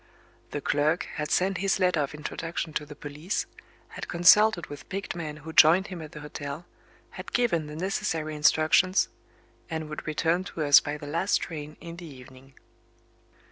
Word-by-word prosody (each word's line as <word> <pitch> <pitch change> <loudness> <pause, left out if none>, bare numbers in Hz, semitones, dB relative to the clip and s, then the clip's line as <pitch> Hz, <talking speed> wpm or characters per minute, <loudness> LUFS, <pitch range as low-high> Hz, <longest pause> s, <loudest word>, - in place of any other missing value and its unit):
The 145 - -4
clerk 150 +5 +1
had 150 -1 -2
sent 190 0 +1
his 195 +1 +1
letter 180 -4 +2
of 145 +1 -3
introduction 165 +1 -5
to 150 - -3
the 150 - -10
police 150 +6 -4 0.4
had - - -7
consulted 185 +2 +5
with 145 - -11
picked 195 -1 -4
men 155 -3 -5
who 160 +2 -9
joined 170 +6 +6
him 170 - -7
at 155 -1 -10
the 150 - -8
hotel 145 +2 -7 0.5
had - - -9
given 185 -11 +1
the 150 - -8
necessary 160 -3 -2
instructions 155 +5 +3 0.6
and 160 -2 -4
would 150 - -7
return 165 +3 +1
to 160 - -4
us 145 -1 +8
by 145 +1 -4
the 150 - -9
last 170 +7 +1
train 150 -2 -7
in 170 0 -9
the 175 -1 -9
evening. 130 -1 -14
155 Hz, 175 wpm, -27 LUFS, 150-175 Hz, 0.6 s, us